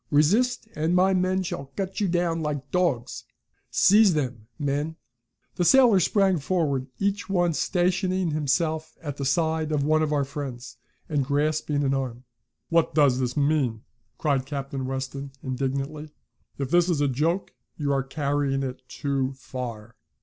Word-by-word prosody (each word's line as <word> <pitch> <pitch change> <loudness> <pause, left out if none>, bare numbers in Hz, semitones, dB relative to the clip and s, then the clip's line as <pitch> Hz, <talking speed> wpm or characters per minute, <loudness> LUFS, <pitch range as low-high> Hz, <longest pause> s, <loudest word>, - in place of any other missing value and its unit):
Resist 215 +13 +2
and 160 +3 +1
my 190 +1 +4
men 185 +1 +1
shall 140 -6 -5
cut 195 +1 -3
you 200 - +2
down 170 -2 0
like 145 -3 -3
dogs! 170 -10 0 0.4
Seize 205 -3 +5
them, 125 -7 -3
men!" 145 +2 -1 0.6
The 180 - +2
sailors 230 -3 +6
sprang 195 -4 +2
forward, 140 -4 0
each 200 +1 -1
one 175 -3 +2
stationing 185 +1 +1
himself 155 +2 -1
at 145 -3 -5
the 140 - -3
side 160 +2 +1
of 150 -2 +1
one 155 +2 +3
of 155 -1 0
our 145 -2 +1
friends, 125 -3 -7 0.3
and 145 -3 0
grasping 145 +1 0
an 135 -1 +1
arm. 130 -3 -3 0.5
"What 165 -1 +2
does 140 -5 +4
this 125 0 -2
mean?" 140 -6 +1 0.3
cried 140 -4 0
Captain 135 -2 -4
Weston 135 +1 -5
indignantly. 135 +3 -3 0.5
"If 135 -2 -3
this 175 0 +4
is 165 -4 +1
a 145 - +3
joke, 160 +8 -1 0.2
you're 140 -3 +1
carrying 140 0 -1
it 130 0 -5
too 135 0 -1
far. 120 -4 -7
150 Hz, 150 wpm, -25 LUFS, 135-175 Hz, 0.6 s, sailors